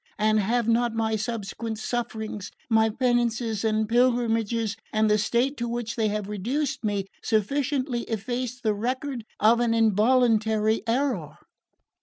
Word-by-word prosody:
And 215 0 +3
have 230 +3 +1
not 230 0 +2
my 220 -1 0
subsequent 220 0 -4
sufferings, 220 -3 -4 0.2
my 220 0 +4
penances 235 -2 0
and 220 -1 +1
pilgrimages, 230 -2 +1 0.2
and 215 0 +2
the 210 - +3
state 245 +6 +1
to 235 - -2
which 235 -2 -3
they 220 -2 +1
have 210 -1 -2
reduced 255 +8 -2
me, 205 -2 -1 0.2
sufficiently 255 +3 0
effaced 245 +3 -4
the 215 -2 +2
record 255 +3 -3 0.2
of 225 +3 +5
an 235 -1 +2
involuntary 220 0 +3
error?" 265 +4 -1
225 Hz, 135 wpm, -26 LUFS, 215-245 Hz, 0.2 s, of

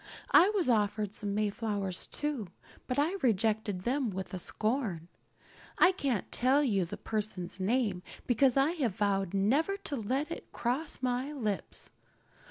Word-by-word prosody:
I 370 - +7
was 405 -7 +1
offered 210 -3 +1
some 205 -1 -3
Mayflowers 205 -3 -1
too, 290 -9 -3 0.4
but 250 - -2
I 320 +7 +2
rejected 220 -5 +1
them 255 +1 0
with 190 -1 -5
scorn. 215 - -1 0.7
I 370 - +7
can't 275 - -2
tell 265 +4 +3
you 200 -9 +2
the 165 - -7
person's 205 -5 -3
name 205 -2 +1 0.2
because 255 +2 +3
I 275 +4 +4
have 265 - -1
vowed 195 -2 0
never 280 - +2
to 320 -7 -4
let 265 +7 -1
it - - -7
cross 260 +4 -2
my 255 +3 0
lips. 215 -9 -3
225 Hz, 145 wpm, -31 LUFS, 200-275 Hz, 0.7 s, I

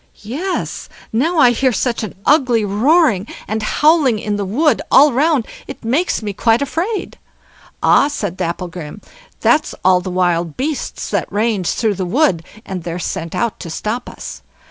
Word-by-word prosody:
"Yes! 315 - -4 0.2
now 315 +10 +1
I 250 -5 +6
hear 260 +2 +1
such 240 0 -1
an 215 - -6
ugly 255 -7 +3
roaring 225 - +3 0.2
and 220 +1 -2
howling 290 +1 +3
in 210 0 -2
the 205 -1 -2
wood 265 +7 +2
all 285 0 +6
round, 285 -2 +2 0.2
it - - -9
makes 270 +2 0
me 205 -1 -3
quite 225 +3 +2
afraid." 355 - -3 0.6
"Ah!" 280 - +5
said 205 -11 -3
Dapplegrim, 175 0 -5 0.4
"that's 310 0 +2
all 185 -1 +5
the 185 - -5
wild 175 -3 0
beasts 290 +2 -3
that - - -1
range 210 -4 0
through 220 -3 0
the 190 -1 -3
wood, 225 - +2 0.2
and 190 -2 -5
they're 170 0 -4
sent 165 -2 -4
out 235 -2 -1
to 170 - -7
stop 215 +9 -4
us. - - -9
225 Hz, 165 wpm, -17 LUFS, 185-285 Hz, 0.6 s, I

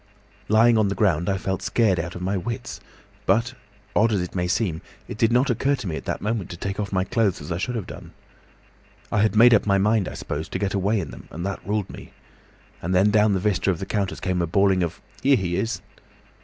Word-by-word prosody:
"Lying 115 +1 +5
on 105 - +3
the 100 - -2
ground, 90 -5 +1
I 95 - +1
felt 95 0 -3
scared 105 -7 +2
out 85 +1 -4
of 90 - -6
my 95 +2 0
wits. 105 +4 -4 0.5
But—odd 105 -2 0
as 105 - +1
it 90 0 -4
may 90 -1 -1
seem—it 90 -2 -3
did 115 +1 +2
not 125 +3 +3
occur 135 +4 +1
to 120 - -8
me 85 -4 -3
at - - -7
the - - -2
moment 105 -3 -2
to 85 - -7
take 95 +3 -4
off 100 -1 -3
my 95 -1 +1
clothes 105 -1 0
as 70 - -8
I 85 - -2
should 125 +6 -2
have 110 -5 -3
done. - - -10 1.0
I 105 - +2
had 110 0 +2
made 120 +2 +7
up 105 - +3
my 100 -1 +4
mind, 105 0 +2
I - - -6
suppose, 80 +3 -5
to - - -3
get 100 0 -1
away 100 +2 +1
in - - -5
them, - - -12
and 85 +4 -6
that 100 0 -3
ruled 105 -2 -1
me. - - -11 0.7
And 90 +3 -1
then 100 +3 +4
down 105 0 +4
the 95 - +1
vista 100 -1 0
of 90 - +1
the 95 - -5
counters 100 -1 -2
came 90 -1 -1
a 85 - 0
bawling 95 +2 +3
of 85 -2 -2 0.2
'Here 140 0 +5
he 90 -4 -2
is! 115 +5 -2
100 Hz, 240 wpm, -24 LUFS, 90-110 Hz, 1.0 s, made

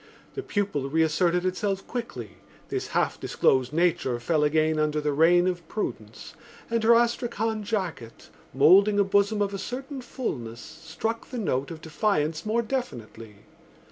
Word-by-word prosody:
The 400 - -4
pupil 200 - -2
reasserted 160 +3 +1
itself 195 +1 -1
quickly, 130 - -6 0.3
this - - -3
half - - -1
disclosed 130 0 +1
nature 155 -7 +1
fell 150 +4 +1
again 155 +1 +2
under 155 0 +1
the 150 -1 -1
reign 175 +4 +4
of 175 -3 -2
prudence, 215 - -6 0.4
and 230 -1 0
her 230 +1 +6
astrakhan 230 -2 0
jacket, 185 - -5 0.2
moulding 190 - +5
a 200 - +5
bosom 200 +2 +2
of 200 0 -3
a 195 - -4
certain 265 +5 -6
fullness, 120 - -5
struck 165 - -5
the 250 - -6
note 140 - -1
of 160 -1 -8
defiance 160 -1 -1
more 235 +2 +1
definitely. 115 - -6
175 Hz, 145 wpm, -26 LUFS, 150-215 Hz, 0.4 s, her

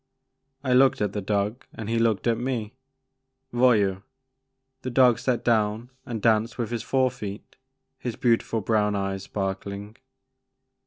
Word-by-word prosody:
I 130 -2 +1
looked 130 +1 +5
at 105 -2 -1
the 105 - -2
dog 105 +4 -1
and 110 - -6
he 115 +1 0
looked 115 -3 +1
at 115 -1 +2
me. 120 -4 -3 0.4
*' 130 0 -51
Voyou!*' 105 -6 +3 0.8
The 130 - -4
dog 125 -2 +5
sat 125 -2 -1
down 110 +1 +1 0.2
and 115 -4 -4
danced 115 0 +2
with 120 -2 -3
his 120 -2 -2
fore 130 +1 +1
feet, 105 -5 -8 0.4
his 120 -3 -4
beautiful 115 -2 +1
brown 105 0 +1
eyes 100 -1 -2
sparkling. 100 +2 -4
115 Hz, 150 wpm, -25 LUFS, 105-125 Hz, 0.8 s, looked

